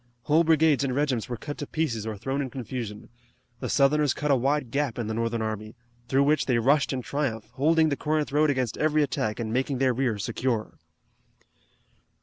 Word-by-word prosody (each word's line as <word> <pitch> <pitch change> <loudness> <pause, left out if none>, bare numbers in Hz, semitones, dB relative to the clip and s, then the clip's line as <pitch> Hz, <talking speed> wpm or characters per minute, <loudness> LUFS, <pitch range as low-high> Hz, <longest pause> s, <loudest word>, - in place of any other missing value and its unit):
Whole 155 +5 +4
brigades 160 -3 +3
and 130 -2 -1
regiments 135 -6 0
were 120 - -3
cut 145 +5 -7
to 145 - -4
pieces 115 -9 -2
or 110 -2 -4
thrown 135 +7 -2
in 135 - -3
confusion. 120 -4 -6 0.5
The - - -4
Southerners 145 0 +3
cut 150 -1 -1
a - - +6
wide 135 0 0
gap 140 -3 -1
in 120 - -2
the 110 - -3
Northern 115 0 -1
army, 110 +1 -5 0.3
through 135 +3 +3
which 150 +2 +2
they 125 -3 +3
rushed 140 +5 +3
in 130 -2 -3
triumph, 125 -7 -3
holding 160 +4 +3
the 140 - 0
Corinth 150 0 -1
road 150 +1 +3
against 130 -5 -1
every 155 0 +3
attack 110 -6 -2
and 110 -1 -3
making 130 +2 0
their 130 -1 +2
rear 120 -3 0
secure. 115 +2 -2
135 Hz, 195 wpm, -26 LUFS, 115-150 Hz, 0.5 s, a